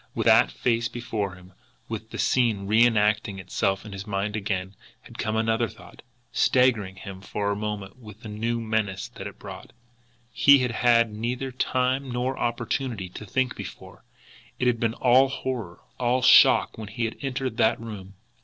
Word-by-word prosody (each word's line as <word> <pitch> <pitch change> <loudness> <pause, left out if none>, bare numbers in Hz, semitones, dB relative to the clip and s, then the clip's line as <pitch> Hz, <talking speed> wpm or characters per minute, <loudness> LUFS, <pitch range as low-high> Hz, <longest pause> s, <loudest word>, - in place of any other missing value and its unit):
With - - -1
that - - +5
face 115 - 0
before 110 -6 -4
him, 90 0 -16 0.3
with 110 0 -6
the - - -7
scene 115 -6 +1
re 110 +4 +4
enacting 105 -2 +1
itself 95 +2 -1
in 105 - -9
his 95 +1 -7
mind 100 +1 -2
again, 95 -2 -3 0.3
had - - -14
come 110 - -1
another 115 +1 +1
thought, 110 +1 -15 0.3
staggering 115 -7 +2
him 95 0 -9
for 100 +1 -2
a - - -1
moment 105 -1 -5
with 110 -2 -13
the - - -7
new 115 +3 -2
menace 110 -4 -2
that - - -8
it - - -11
brought. - - -10 0.6
He 140 0 +6
had 125 -2 0
had 115 -1 +3
neither 125 +5 -3
time 130 +1 0
nor 125 +2 -1
opportunity 120 -4 -2
to 105 +4 -10
think 130 +4 0
before; - - -10 0.5
it - - -1
had 120 -2 +2
been 115 0 0
all 130 +2 +5
horror, 125 -9 -5 0.2
all 125 +1 +1
shock - - +6
when 110 - -6
he 115 +3 -3
had 115 - -4
entered 130 -3 -3
that 110 - +3
room. 100 -4 -9
110 Hz, 175 wpm, -25 LUFS, 100-125 Hz, 0.6 s, He